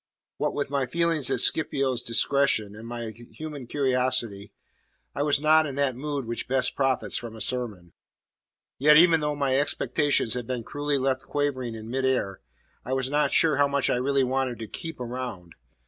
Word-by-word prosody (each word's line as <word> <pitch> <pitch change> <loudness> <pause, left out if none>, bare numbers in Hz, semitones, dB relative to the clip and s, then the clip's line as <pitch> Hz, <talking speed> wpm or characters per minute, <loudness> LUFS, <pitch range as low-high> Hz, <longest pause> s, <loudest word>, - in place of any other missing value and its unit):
What - - -1
with 140 -1 -3
my 140 -2 0
feelings 165 -1 +1
at 130 -3 +1
Scipio's 135 -5 +1
discretion, 115 -4 +1
and 110 +2 -10
my 120 -1 -5
human 130 +4 -9
curiosity, 125 -7 -1 0.6
I - - -3
was 145 -1 +2
not 155 +1 +4
in 135 - -6
that 140 -3 0
mood 140 0 -4
which 115 +1 -4
best 130 0 +2
profits 135 -2 +1
from 115 -1 -7
a - - -10
sermon. 105 -7 -2 0.9
Yet 150 +3 +6
even 165 0 +6
though 150 -1 -1
my 135 -2 +1
expectations 145 -4 +1
had 120 -2 -4
been 125 -2 -3
cruelly 145 +3 -2
left 135 0 -1
quivering 130 -5 -2
in 110 +1 -8
mid 135 +1 -1
air, 110 -8 -1 0.4
I 130 - -4
was 130 0 -1
not 150 +1 +1
sure 155 -4 +4
how 145 0 +4
much 140 -1 +1
I - - +1
really 135 +2 +1
wanted 130 -1 -1
to 110 0 -7
"keep 160 - -5
around." 120 -9 -6
130 Hz, 180 wpm, -26 LUFS, 120-145 Hz, 0.9 s, Yet